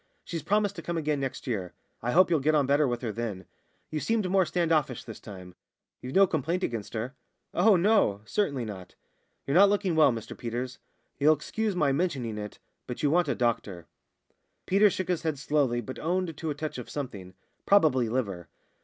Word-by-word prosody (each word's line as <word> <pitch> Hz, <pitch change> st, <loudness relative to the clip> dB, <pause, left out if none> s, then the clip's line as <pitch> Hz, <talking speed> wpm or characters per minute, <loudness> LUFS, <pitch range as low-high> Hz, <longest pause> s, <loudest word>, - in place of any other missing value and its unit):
She's 165 Hz, -2 st, -5 dB
promised 205 Hz, -1 st, +1 dB
to -, -, -5 dB
come 170 Hz, 0 st, -3 dB
again 150 Hz, -2 st, 0 dB
next 135 Hz, -1 st, -4 dB
year. 100 Hz, -8 st, -3 dB, 0.3 s
I 120 Hz, -, -2 dB
hope 180 Hz, +3 st, +5 dB
you'll 165 Hz, -, +4 dB
get 155 Hz, +3 st, +2 dB
on 145 Hz, -2 st, +3 dB
better 140 Hz, +2 st, +3 dB
with 120 Hz, -1 st, -2 dB
her 115 Hz, -4 st, -2 dB
then. 105 Hz, -5 st, -4 dB, 0.5 s
You 155 Hz, -, -1 dB
seemed 215 Hz, +6 st, 0 dB
more 185 Hz, -1 st, +3 dB
stand 170 Hz, 0 st, 0 dB
offish 145 Hz, -6 st, +1 dB
this 115 Hz, -3 st, -9 dB
time 90 Hz, -4 st, -10 dB, 0.5 s
you've 130 Hz, +1 st, -7 dB
no 195 Hz, +1 st, +7 dB
complaint 170 Hz, +2 st, -1 dB
against 115 Hz, -2 st, -3 dB
her?" 115 Hz, +4 st, -3 dB, 0.4 s
"Oh, 200 Hz, +3 st, +5 dB
no! 180 Hz, -, +3 dB
certainly 140 Hz, -, -1 dB
not." 95 Hz, -4 st, -9 dB, 0.5 s
"You're 140 Hz, -, -1 dB
not 195 Hz, +3 st, +7 dB
looking 200 Hz, -4 st, +1 dB
well, 155 Hz, -4 st, +6 dB
Mr 115 Hz, -2 st, -6 dB
Peters. 120 Hz, +2 st, -5 dB, 0.4 s
You'll 155 Hz, +2 st, +5 dB
excuse 210 Hz, +7 st, -2 dB
my 150 Hz, -6 st, +2 dB
mentioning 135 Hz, -8 st, -1 dB
it, 105 Hz, 0 st, -7 dB, 0.3 s
but 125 Hz, -, -6 dB
you 145 Hz, -, +3 dB
want 175 Hz, 0 st, +3 dB
a 140 Hz, -, 0 dB
doctor." 105 Hz, -8 st, -1 dB, 0.8 s
Peters 200 Hz, +1 st, +4 dB
shook 185 Hz, -, -3 dB
his 180 Hz, -3 st, 0 dB
head 160 Hz, -3 st, -1 dB
slowly, 135 Hz, -4 st, +1 dB
but 130 Hz, +3 st, -8 dB
owned 175 Hz, 0 st, -1 dB
to 160 Hz, +1 st, -4 dB
a 150 Hz, -, -2 dB
touch 150 Hz, -3 st, -4 dB
of 125 Hz, -, -8 dB
something 100 Hz, -10 st, -6 dB, 0.3 s
probably 145 Hz, -, +4 dB
liver. 100 Hz, -8 st, -2 dB
145 Hz, 200 wpm, -28 LUFS, 120-175 Hz, 0.8 s, no